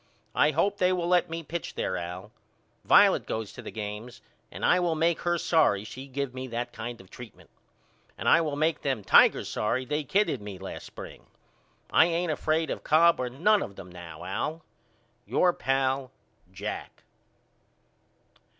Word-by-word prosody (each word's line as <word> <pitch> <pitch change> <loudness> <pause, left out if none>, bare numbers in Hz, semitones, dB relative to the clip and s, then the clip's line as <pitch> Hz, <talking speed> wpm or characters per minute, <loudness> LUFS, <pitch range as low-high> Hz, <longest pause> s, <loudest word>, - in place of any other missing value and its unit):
I 150 - +4
hope 195 +7 0
they 180 0 +3
will 180 -2 0
let 180 -1 +3
me 165 0 -5
pitch 170 +2 -5
there 95 - -2
Al. 90 +1 -6 0.5
Violet - - +5
goes 110 -2 -4
to - - -9
the 110 - -8
games 105 +2 -7 0.3
and - - -4
I 180 - +4
will 175 -2 +1
make 165 +1 +1
her 175 0 0
sorry 150 - +2
she 130 +5 -9
give 135 -1 -4
me 130 0 -6
that 120 0 -4
kind 120 +1 -6
of 95 - -16
treatment. 120 -3 -12 0.7
And - - -4
I 170 - +6
will 150 -3 -2
make 155 +2 0
them 130 -7 -1
Tigers - - +5
sorry 120 +4 -1
they 150 +4 -2
kidded 200 - +1
me 100 -2 -7
last 95 +1 -8
spring. - - -11 0.6
I - - +6
ain't 170 0 0
afraid 155 +1 0
of - - -5
Cobb 165 +2 +4
or 125 -1 -1
none 195 - +3
of 100 - -6
them 90 -2 -11
now, 85 -2 -10
Al. 155 - -3 0.6
Your 180 -1 +3
pal, 135 0 0 0.4
JACK. 100 +3 -6
135 Hz, 170 wpm, -27 LUFS, 110-165 Hz, 0.7 s, I